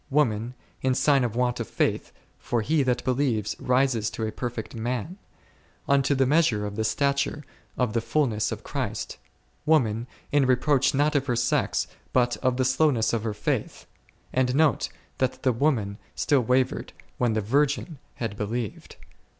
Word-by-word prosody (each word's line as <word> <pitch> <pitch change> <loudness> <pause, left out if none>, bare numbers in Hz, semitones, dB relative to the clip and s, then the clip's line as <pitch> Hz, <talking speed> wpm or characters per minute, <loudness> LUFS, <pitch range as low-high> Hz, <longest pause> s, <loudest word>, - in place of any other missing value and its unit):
Woman, 125 -4 +1 0.3
in 130 -1 +1
sign 135 0 +3
of 115 -2 -2
want 125 0 0
of 115 - -3
faith, - - -1 0.3
for 120 -2 -1
he 155 +5 +2
that 125 -2 0
believes 125 -5 0
rises 125 -4 +2
to 110 - -4
a 110 - -2
perfect 120 0 -5
man, 125 - -3 0.7
unto 140 0 +3
the 135 0 +3
measure 130 -8 +2
of 105 0 -5
the 110 - -1
stature 140 +6 0 0.3
of 125 -4 0
the 115 - +1
fulness 115 -3 0
of - - -5
Christ; - - -4 0.4
woman, 120 -7 +2 0.2
in 145 -2 +3
reproach 135 +2 +3
not 150 +2 +2
of 140 0 +1
her 125 - +1
sex, 120 +1 +1 0.3
but 120 -1 +3
of 130 -1 0
the 130 - +2
slowness 130 -3 +2
of 115 - +1
her 110 -1 -3
faith; - - -2 0.5
and 130 0 +1
note, 135 - +3 0.3
that 130 - -1
the 130 - +3
woman 115 -6 0 0.2
still 140 -3 +2
wavered, 125 +2 0 0.3
when 120 -3 +2
the 110 - +1
virgin 145 - 0 0.2
had 115 -4 -4
believed. 110 +1 -4
125 Hz, 165 wpm, -26 LUFS, 115-140 Hz, 0.7 s, sign